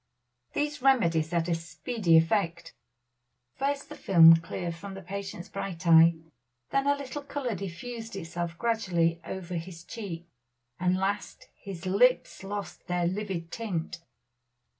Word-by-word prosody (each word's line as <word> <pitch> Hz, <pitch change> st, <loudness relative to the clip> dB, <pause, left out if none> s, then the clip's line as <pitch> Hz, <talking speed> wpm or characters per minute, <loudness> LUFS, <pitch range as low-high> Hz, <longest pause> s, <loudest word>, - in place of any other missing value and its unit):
These 295 Hz, -1 st, -1 dB
remedies 170 Hz, -13 st, +3 dB
had 170 Hz, -1 st, 0 dB
a 175 Hz, -, +1 dB
speedy 165 Hz, +3 st, +1 dB
effect. 170 Hz, -1 st, +1 dB, 0.8 s
First 275 Hz, +1 st, -1 dB
the -, -, -9 dB
film 165 Hz, -3 st, +8 dB
cleared 170 Hz, +1 st, -4 dB
from 195 Hz, +4 st, -8 dB
the 195 Hz, -, -8 dB
patient's 195 Hz, -1 st, -6 dB
bright 180 Hz, -2 st, -5 dB
eye, 165 Hz, 0 st, +7 dB, 0.6 s
then 275 Hz, 0 st, +1 dB
a 285 Hz, -, +4 dB
little 280 Hz, 0 st, -6 dB
color 280 Hz, -4 st, -3 dB
diffused 215 Hz, +5 st, -6 dB
itself 170 Hz, -1 st, -4 dB
gradually 175 Hz, -8 st, +1 dB
over 185 Hz, 0 st, -6 dB
his 165 Hz, 0 st, -8 dB
cheek, 180 Hz, -6 st, -7 dB, 0.5 s
and 180 Hz, +1 st, +2 dB
last 195 Hz, +2 st, -3 dB
his 190 Hz, -3 st, -8 dB
lips 205 Hz, +3 st, +2 dB
lost 195 Hz, -3 st, -6 dB
their 175 Hz, -1 st, 0 dB
livid 185 Hz, -3 st, -3 dB
tint. 175 Hz, -6 st, -4 dB
185 Hz, 135 wpm, -28 LUFS, 170-225 Hz, 0.8 s, film